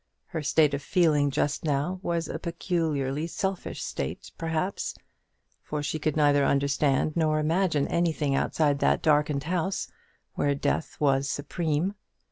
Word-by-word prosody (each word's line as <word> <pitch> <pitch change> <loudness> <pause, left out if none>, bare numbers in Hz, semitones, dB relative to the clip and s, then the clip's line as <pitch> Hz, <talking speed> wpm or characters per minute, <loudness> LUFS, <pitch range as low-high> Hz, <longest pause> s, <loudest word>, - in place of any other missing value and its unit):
Her 160 -4 -3
state 150 0 +3
of 140 - -1
feeling 150 -4 +3
just 140 +1 -1
now 155 +5 0
was 170 -2 -1
a 160 - -4
peculiarly 160 -4 -1
selfish 190 +2 -3
state, - - -5
perhaps; 165 +4 -2 0.7
for 150 -1 -4
she 155 +2 -2
could 155 0 -1
neither 145 -2 +4
understand 140 +1 +2
nor 155 -2 +2
imagine 160 -1 +1
anything 160 -4 0
outside 145 0 +1
that - - +2
darkened 150 -2 +2
house, 180 +4 -1 0.4
where 145 0 +1
death 140 - -1
was 140 -1 +2
supreme. 155 +5 -1
155 Hz, 135 wpm, -27 LUFS, 145-170 Hz, 0.7 s, neither